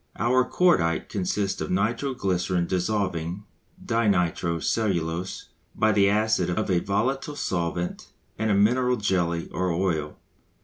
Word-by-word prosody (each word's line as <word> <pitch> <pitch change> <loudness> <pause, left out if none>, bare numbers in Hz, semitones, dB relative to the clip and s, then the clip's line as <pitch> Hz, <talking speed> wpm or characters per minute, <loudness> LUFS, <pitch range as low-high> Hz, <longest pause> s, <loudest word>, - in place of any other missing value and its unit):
Our 125 +3 +3
cordite 85 - +2
consists 95 0 -2
of - - -3
nitro 115 +8 0
glycerine 90 -3 0
dissolving 90 -1 -2 0.4
di 115 0 +1
nitro 85 -3 +1
cellulose 90 -2 -2 0.3
by 110 - +3
the 100 -2 +4
acid 105 -3 +1
of 100 +3 -1
a 90 - +3
volatile 130 +10 -1
solvent 85 -6 -3 0.3
and 110 +1 -1
a 105 - +3
mineral 125 +5 +3
jelly 85 -5 0
or 90 0 -1
oil. 80 -4 -1
95 Hz, 130 wpm, -25 LUFS, 85-110 Hz, 0.4 s, the